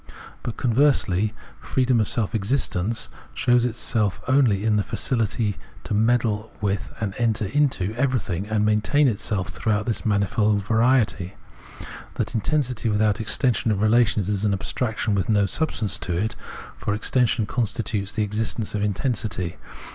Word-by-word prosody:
But, 120 - -5
conversely, 115 -6 +2 0.3
freedom 130 -2 +1
of 110 - +1
self 110 -4 -1
exist 110 +4 0
ence 105 +6 0
{Filrsicliseyn) - - -21
shows 120 0 +3
itself 110 -4 0
only 125 -7 +3
in 110 -1 +3
the - - +2
faciUty 110 -4 -1 0.3
to - - -4
meddle 110 0 +1
with 100 -1 -2
and 105 -3 -2
enter 115 -2 +1
into 110 -4 0
everything, 115 -7 -1
and 105 -1 +1
maintain 110 +8 +3
itself 105 -5 -1
throughout 105 +4 -1
this 115 - -1
manifold 105 0 +1
variety. 110 -5 +2 0.8
That - - -2
intensity 125 -1 0
without 105 0 +1
extension 115 +2 +1
of 105 -1 +1
relations 110 -3 +3
is 100 -1 -1
an 105 -2 +2
abstraction 110 +2 -1
with 100 0 0
no 100 -2 +3
substance 105 - -1
in 90 - -1
it, 110 +5 -1 0.4
for 105 - -1
extension 115 0 +1
constitutes 110 -3 -1
the 105 +1 -1
existence 105 +1 -2
of 105 - -1
intensity. 105 -4 -2
110 Hz, 145 wpm, -23 LUFS, 100-120 Hz, 0.8 s, shows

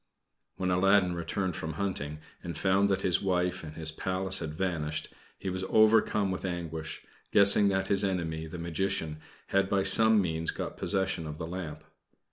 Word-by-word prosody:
When 90 -1 -2
Aladdin 95 0 +3
returned 85 +1 -3
from 80 0 -5
hunting 75 -5 -3 0.2
and 85 -1 -6
found 100 +1 +2
that 95 - 0
his 90 0 +2
wife 90 -1 -1
and 75 -1 -9
his 80 -1 -1
Palace 95 +3 -1
had 75 -2 -5
vanished, 80 -4 -3 0.2
he 95 - -4
was 95 0 -3
overcome 110 -2 +3
with 95 - -4
anguish, 80 -3 -5 0.3
guessing 100 0 +6
that 95 -1 0
his 100 0 +4
enemy, 80 -4 -2
the 80 - -8
Magician, 85 -2 -2 0.3
had 100 0 +1
by 100 -1 +1
some 110 +3 +6
means 80 -3 -1
got - - -4
possession 95 -4 -1
of 75 0 -7
the 80 - -5
lamp. 85 -2 -6
90 Hz, 170 wpm, -29 LUFS, 80-95 Hz, 0.3 s, guessing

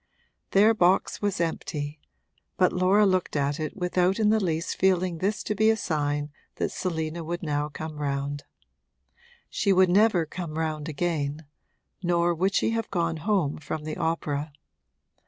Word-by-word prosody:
Their 210 +3 +5
box 185 -3 +2
was 205 -4 -1
empty, 150 -3 -3 0.6
but 185 - +3
Laura 185 +3 +4
looked 185 -4 +1
at 145 +1 0
it 155 +5 -4
without 180 0 +1
in 215 -2 +3
the 220 0 +4
least 165 -1 -1
feeling 185 -2 +1
this 200 +4 -1
to - - -1
be 215 +1 +3
a 220 - +3
sign 145 -5 -1 0.2
that - - -2
Selina 165 -2 -3
would 170 +2 -4
now 150 -1 -1
come 155 +1 -7
round. 140 0 -2 1.0
She 200 - 0
would 185 -1 +5
never 195 -2 +4
come 160 -1 -6
round 155 -1 -2
again, 155 -1 -2 0.6
nor 175 -1 +2
would 190 +4 0
she - - +2
have 225 0 -2
gone 170 -3 -1
home 165 -4 0
from 155 0 -5
the 155 0 -5
opera. 150 -2 -2
170 Hz, 155 wpm, -26 LUFS, 155-190 Hz, 1.0 s, Their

